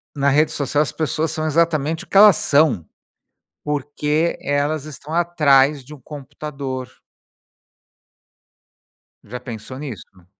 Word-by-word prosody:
na 140 Hz, 0 st, +2 dB
rede 150 Hz, +3 st, +3 dB
social, 145 Hz, +1 st, 0 dB
as 135 Hz, -, -4 dB
pessoas 155 Hz, 0 st, -2 dB
são 155 Hz, -, -3 dB
exatamente 160 Hz, 0 st, 0 dB
o -, -, -17 dB
que -, -, 0 dB
elas 205 Hz, -2 st, +9 dB
são, 145 Hz, -, +2 dB, 0.8 s
porque 150 Hz, +3 st, -1 dB
elas 145 Hz, +1 st, -1 dB
estão 155 Hz, +1 st, -8 dB
atrás 150 Hz, -5 st, +3 dB
de 150 Hz, +4 st, -11 dB
um 145 Hz, -, -15 dB
computador. 140 Hz, -2 st, -7 dB, 2.4 s
Já 125 Hz, +3 st, -8 dB
pensou 120 Hz, +1 st, -8 dB
nisso? 110 Hz, -10 st, -10 dB
145 Hz, 120 wpm, -20 LUFS, 135-155 Hz, 2.4 s, elas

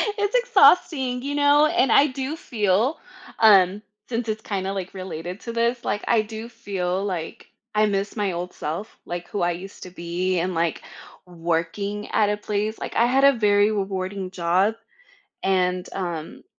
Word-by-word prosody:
It's 410 Hz, +3 st, -1 dB
exhausting, 360 Hz, -, +4 dB
you 285 Hz, +1 st, -3 dB
know? 290 Hz, +1 st, +5 dB
And 305 Hz, -6 st, +2 dB
I 285 Hz, -, +6 dB
do 270 Hz, +2 st, -4 dB
feel, 220 Hz, -, 0 dB, 0.4 s
um, 200 Hz, -2 st, +6 dB, 0.3 s
since 235 Hz, -1 st, -3 dB
it's 215 Hz, 0 st, -2 dB
kinda, 195 Hz, -3 st, -3 dB
like, 190 Hz, -2 st, -5 dB
related 185 Hz, 0 st, -6 dB
to 235 Hz, -, -6 dB
this, 235 Hz, +1 st, 0 dB
like, 205 Hz, -, -2 dB
I 230 Hz, -2 st, +4 dB
do 220 Hz, +1 st, -7 dB
feel, 190 Hz, -3 st, -3 dB
like, 180 Hz, -5 st, -5 dB, 0.3 s
I 215 Hz, 0 st, +3 dB
miss 200 Hz, 0 st, -2 dB
my 205 Hz, -4 st, -1 dB
old 175 Hz, +1 st, -5 dB
self, 170 Hz, +9 st, -5 dB
like, 175 Hz, 0 st, -5 dB
who 205 Hz, -, -3 dB
I 175 Hz, 0 st, +2 dB
used 185 Hz, +3 st, -8 dB
to 185 Hz, -, -8 dB
be 180 Hz, +1 st, -2 dB
and, 180 Hz, +2 st, -1 dB
like, 165 Hz, -1 st, -1 dB, 0.4 s
working 175 Hz, +4 st, -3 dB
at 210 Hz, -, +3 dB
a 210 Hz, -, 0 dB
place. 210 Hz, +1 st, -2 dB
Like, -, -, -6 dB
I 235 Hz, -, +4 dB
had 265 Hz, +3 st, +2 dB
a 280 Hz, -, +7 dB
very 210 Hz, -2 st, +3 dB
rewarding 195 Hz, -1 st, -3 dB
job, 185 Hz, +4 st, +1 dB, 0.7 s
and, 185 Hz, -1 st, +1 dB
um, 170 Hz, -4 st, -5 dB
205 Hz, 170 wpm, -23 LUFS, 180-235 Hz, 0.7 s, a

